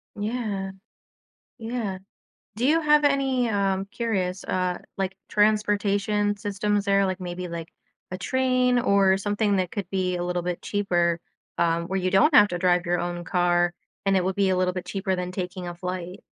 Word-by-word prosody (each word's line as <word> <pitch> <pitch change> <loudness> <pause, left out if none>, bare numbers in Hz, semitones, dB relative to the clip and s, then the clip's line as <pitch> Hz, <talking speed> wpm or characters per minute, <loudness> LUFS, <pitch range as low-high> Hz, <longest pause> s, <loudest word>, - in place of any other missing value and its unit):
Yeah. 205 -3 -3 0.9
Yeah. 225 -5 -3 0.6
Do 240 +3 -1
you 325 +3 +4
have 300 -1 +4
any, 270 -3 +2
um- 195 -2 0
curious- 195 -5 -2
uh, 180 -1 -1 0.2
like, 190 0 -2
transportation 205 -1 +2
systems 205 0 -1
there? 200 0 +3
Like, 185 0 -2
maybe, 180 0 -5
like, 170 -1 -6 0.4
a 185 - -3
train 255 +3 +2
or 200 -5 +4
something 205 +1 0
that 185 -2 -1
could 200 -4 -4
be 185 -2 0
a 175 - -2
little 180 0 -1
bit 175 0 -3
cheaper, 175 -4 0 0.4
um, 170 0 +1
where 190 +1 -1
you 185 0 -1
don't 195 +11 +4
have 205 -5 +8
to 175 - -2
drive 180 -1 +2
your 175 0 +1
own 175 0 -3
car, 175 0 +2 0.3
and 195 0 +3
it 185 - +1
would 190 +1 -1
be 200 -1 +2
a 185 - +2
little 180 0 +1
bit 180 -1 -5
cheaper 190 -1 -2
than 180 0 -4
taking 180 -1 -5
a 175 - -6
flight. 180 +1 -5
190 Hz, 180 wpm, -25 LUFS, 180-210 Hz, 0.9 s, have